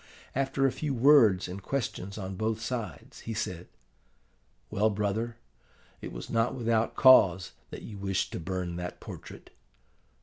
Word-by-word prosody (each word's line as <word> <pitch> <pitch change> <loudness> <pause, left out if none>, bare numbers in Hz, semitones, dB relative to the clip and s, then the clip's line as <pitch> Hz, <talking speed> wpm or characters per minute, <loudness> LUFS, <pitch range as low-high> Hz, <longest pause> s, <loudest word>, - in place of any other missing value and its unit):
After 135 0 0
a 135 - +3
few 145 -1 -3
words 115 -8 +5
and 95 +2 -7
questions 100 -5 -3
on 95 -2 -5
both 110 +3 -1
sides, 110 - -5
he 115 - -6
said, 90 -5 -4 1.0
'Well, 110 +1 +2
brother, 105 +3 -2 0.6
it - - -6
was - - -7
not 115 +2 +1
without 115 -2 0
cause 95 -8 +6 0.2
that - - -8
you 105 -3 -8
wished 95 -1 -1
to - - -4
burn 90 0 -3
that 90 0 -6
portrait. - - -10
105 Hz, 145 wpm, -29 LUFS, 95-120 Hz, 1.0 s, cause